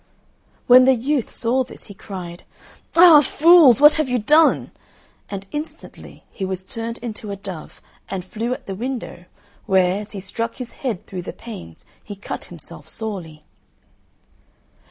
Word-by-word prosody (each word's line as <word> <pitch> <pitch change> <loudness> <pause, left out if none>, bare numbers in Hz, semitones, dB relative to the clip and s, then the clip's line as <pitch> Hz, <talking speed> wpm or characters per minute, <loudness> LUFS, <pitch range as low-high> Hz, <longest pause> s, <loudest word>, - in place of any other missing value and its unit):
When 255 +1 +7
the 265 0 +5
youth 260 +1 -1
saw 250 +3 0
this, - - -9
he 200 - -9
cried, 180 -4 -9 0.5
"Ah, 330 -3 +9
fools, 305 -3 +6
what 295 +1 +8
have 285 - -3
you 250 - +1
done!" 300 +9 +3 0.6
and 195 -1 -6
instantly 300 +2 -8
he 195 - -7
was 190 -1 -3
turned 230 +4 -6
into 220 -2 -6
a 200 - -4
dove 190 -5 -10 0.3
and 185 -2 -5
flew 230 +5 -4
at 260 +1 -5
the 195 - -5
window, 235 -4 -6 0.4
where, 190 +1 +2
as 210 - -9
he 200 - -5
struck 230 +4 -4
his 250 -2 -8
head 240 -9 -3
through 185 -2 -6
the 175 - -7
panes, 85 - -11 0.2
he 205 - -8
cut 200 - -7
himself - - -8
sorely. 180 -9 -6
225 Hz, 155 wpm, -21 LUFS, 190-255 Hz, 0.6 s, Ah